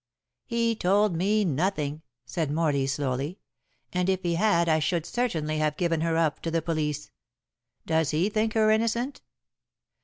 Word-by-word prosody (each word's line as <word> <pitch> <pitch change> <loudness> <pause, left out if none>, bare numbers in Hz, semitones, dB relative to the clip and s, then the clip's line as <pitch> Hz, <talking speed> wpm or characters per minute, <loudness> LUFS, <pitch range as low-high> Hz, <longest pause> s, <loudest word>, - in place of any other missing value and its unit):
"He 230 -1 +1
told 200 -1 +2
me 205 +5 +2
nothing," 155 -2 -1 0.2
said 140 +5 -2
Morley 145 -3 +1
slowly, 140 +4 -2 0.6
"and 180 +1 +1
if 190 -1 0
he 170 -1 0
had 170 -2 +2
I 160 -1 +3
should 170 +1 0
certainly 160 -12 -1
have 150 -1 0
given 165 -3 0
her 165 0 +1
up 160 -2 +1
to 165 - -2
the 165 -1 0
police. 150 -3 -2 0.7
Does 160 -3 +1
he 160 +5 +1
think 215 +1 0
her 215 -1 +4
innocent?" 230 +4 0
165 Hz, 155 wpm, -27 LUFS, 155-205 Hz, 0.7 s, her